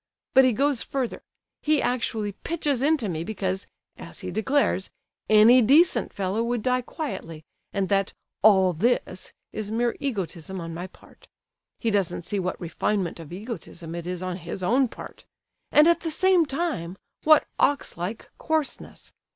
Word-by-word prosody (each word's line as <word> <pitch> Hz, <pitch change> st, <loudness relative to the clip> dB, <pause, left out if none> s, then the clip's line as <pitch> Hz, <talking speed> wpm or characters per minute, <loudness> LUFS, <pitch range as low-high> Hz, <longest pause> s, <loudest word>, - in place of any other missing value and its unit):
But 265 Hz, 0 st, +7 dB
he 255 Hz, -, +4 dB
goes 275 Hz, +2 st, +1 dB
further, 260 Hz, -4 st, -3 dB, 0.4 s
he 305 Hz, -1 st, +2 dB
actually 225 Hz, -5 st, -1 dB
pitches 290 Hz, -, -2 dB
into 290 Hz, -5 st, +2 dB
me 165 Hz, -3 st, -3 dB
because, 190 Hz, -1 st, -3 dB, 0.3 s
as -, -, -9 dB
he -, -, -5 dB
declares, 220 Hz, -3 st, +1 dB, 0.4 s
'any 220 Hz, +4 st, +7 dB
decent 290 Hz, +10 st, +4 dB
fellow' 195 Hz, +3 st, -1 dB
would 235 Hz, -1 st, -1 dB
die 255 Hz, 0 st, +2 dB
quietly, 165 Hz, -, -6 dB, 0.3 s
and 195 Hz, -2 st, -1 dB
that 195 Hz, -1 st, +1 dB, 0.3 s
'all 190 Hz, -3 st, +5 dB
this' 190 Hz, 0 st, -1 dB, 0.2 s
is 215 Hz, -1 st, -4 dB
mere 235 Hz, +2 st, 0 dB
egotism 190 Hz, -, -4 dB
on 165 Hz, -1 st, -6 dB
my 175 Hz, +3 st, -5 dB
part. -, -, -20 dB, 0.5 s
He 230 Hz, -, -1 dB
doesn't 185 Hz, -4 st, 0 dB
see 200 Hz, +4 st, -2 dB
what 185 Hz, 0 st, -3 dB
refinement 175 Hz, +1 st, -2 dB
of 165 Hz, -2 st, -10 dB
egotism 180 Hz, -4 st, -7 dB
it 170 Hz, 0 st, -5 dB
is 180 Hz, 0 st, -4 dB
on 185 Hz, -1 st, -3 dB
his 175 Hz, +1 st, -6 dB
own 255 Hz, +7 st, +3 dB
part—and 300 Hz, +5 st, -1 dB
at 340 Hz, -, +4 dB
the 330 Hz, -, -3 dB
same 360 Hz, 0 st, +3 dB
time, 270 Hz, -, -3 dB, 0.3 s
what 310 Hz, -1 st, +6 dB
ox 285 Hz, 0 st, +1 dB
like 180 Hz, +7 st, -5 dB
coarseness! 315 Hz, -3 st, -3 dB
215 Hz, 155 wpm, -25 LUFS, 185-270 Hz, 0.5 s, But